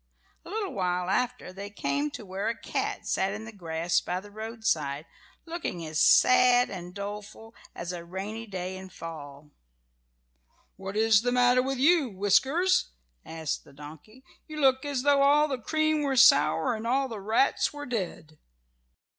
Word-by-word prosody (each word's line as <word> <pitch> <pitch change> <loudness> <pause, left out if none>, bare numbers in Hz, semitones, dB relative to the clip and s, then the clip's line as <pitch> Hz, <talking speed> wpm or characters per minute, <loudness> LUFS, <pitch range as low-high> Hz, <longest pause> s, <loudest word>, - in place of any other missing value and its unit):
A - - -12
little 410 -1 -3
while 180 -1 -1
after 250 -5 -2
they 200 +2 -7
came 145 -6 -2
to 210 - -9
where 190 +3 -3
a 230 - -3
cat - - -3
sat 195 +1 0
in 215 +1 -7
the 220 - -9
grass 170 -3 -1
by 180 +1 -3
the 205 +2 -14
roadside, 210 -10 -2 0.4
looking 330 - -5
as 155 -1 -1
sad 250 -1 +5
and 180 -2 -7
doleful 205 +2 -8 0.2
as 175 +1 -5
a 170 -1 -6
rainy 200 +6 -6
day 185 -1 -5
in 190 0 -10
fall. 150 -4 -10 1.2
"What 195 +1 -6
is 220 -1 +4
the 245 +1 0
matter 250 0 +4
with 270 +1 -2
you, 300 0 +3
Whiskers?" 265 - +2 0.3
asked 160 -2 -4
the 140 - -18
donkey. 155 - -13 0.2
"You 310 -1 -7
look 265 -1 +3
as 280 -3 -2
though 285 -1 +4
all 295 +2 +5
the 265 -4 -3
cream 310 +5 0
were 275 -2 -1
sour 250 +1 +5
and 225 +1 -5
all 270 +3 +1
the 225 -5 -7
rats 220 +7 +1
were 290 0 -8
dead." 175 - -5
215 Hz, 165 wpm, -27 LUFS, 180-260 Hz, 1.2 s, sad